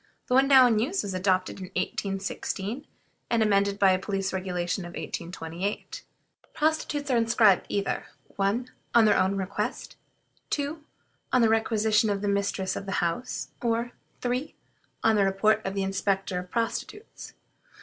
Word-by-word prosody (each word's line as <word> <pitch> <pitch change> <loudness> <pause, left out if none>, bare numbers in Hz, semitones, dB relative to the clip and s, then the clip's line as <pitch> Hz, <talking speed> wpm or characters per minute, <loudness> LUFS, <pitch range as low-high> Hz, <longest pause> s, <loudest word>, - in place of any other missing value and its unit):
The 250 - -2
one 265 +1 +5
now 265 -2 +8
in 225 -3 +3
use 320 - 0
was 195 - -4
adopted 185 0 0
in 185 - -5
1816, 195 +6 -3 0.4
and 230 -2 +3
amended 200 -1 +2
by 195 -2 +5
a 185 - +2
police 195 -1 -2
regulation 180 -1 -2
of 175 0 -8
1828. 170 +3 -5 0.5
Prostitutes 300 -2 0
are 245 - +3
inscribed 230 -4 +4
either 200 -1 -2 0.3
1. 215 +6 0 0.2
On 235 -2 +7
their 210 - +5
own 190 +1 +2
request; 190 0 -3 0.5
2. 295 +2 -2 0.5
On 250 -2 +4
the 225 - +5
requisition 220 -1 +2
of 200 0 -1
the - - 0
mistress 200 -1 0
of 195 - -6
a 195 - -2
house; 175 +10 -2
or, 235 0 0 0.3
3. 250 +4 -2 0.5
On 225 -1 +4
the 205 - +4
report 205 +3 +2
of 195 +1 -3
the 195 - 0
inspector 195 -1 -1
of 180 0 -9
prostitutes. 235 - -4
205 Hz, 155 wpm, -27 LUFS, 190-235 Hz, 0.5 s, now